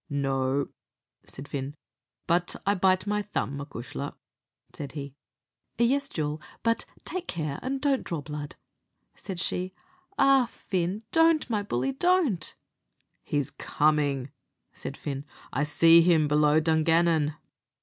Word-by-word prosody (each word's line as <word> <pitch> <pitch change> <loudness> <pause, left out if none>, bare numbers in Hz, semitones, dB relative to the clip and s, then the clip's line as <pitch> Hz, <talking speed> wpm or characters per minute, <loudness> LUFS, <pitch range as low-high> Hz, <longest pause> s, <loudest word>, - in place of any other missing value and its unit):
"No," 135 -1 0 0.6
said 135 +2 -9
Fin; 140 0 -4 0.5
"but 175 +1 +1
I 200 - +4
bite 185 0 +3
my 210 0 0
thumb, 145 -9 -3
acushla," 140 0 -6 0.6
said 140 - -7
he. 140 -2 -6 0.6
"Yes, 275 +4 +2
jewel; 150 -1 -3 0.2
but 230 0 +1 0.2
take 365 -1 -4
care 155 -5 -3
and 270 +2 -2
don't 275 -2 +1
draw 170 -4 -3
blood," 150 0 -6 0.6
said 190 -3 -7
she. 185 +2 -2 0.4
"Ah, 275 -2 +5
Fin! 185 +2 -2
don't, 325 -1 +4
my 210 -2 +1
bully 240 +6 -1
don't." 290 - +1 0.7
"He's 145 -3 -1
coming," 145 -3 +1 0.4
said - - -6
Fin; 140 -1 -4 0.3
"I 135 - 0
see 165 +3 +7
him 165 -3 +4
below 150 +1 +4
Dungannon." 160 -1 +3
165 Hz, 125 wpm, -28 LUFS, 145-210 Hz, 0.7 s, see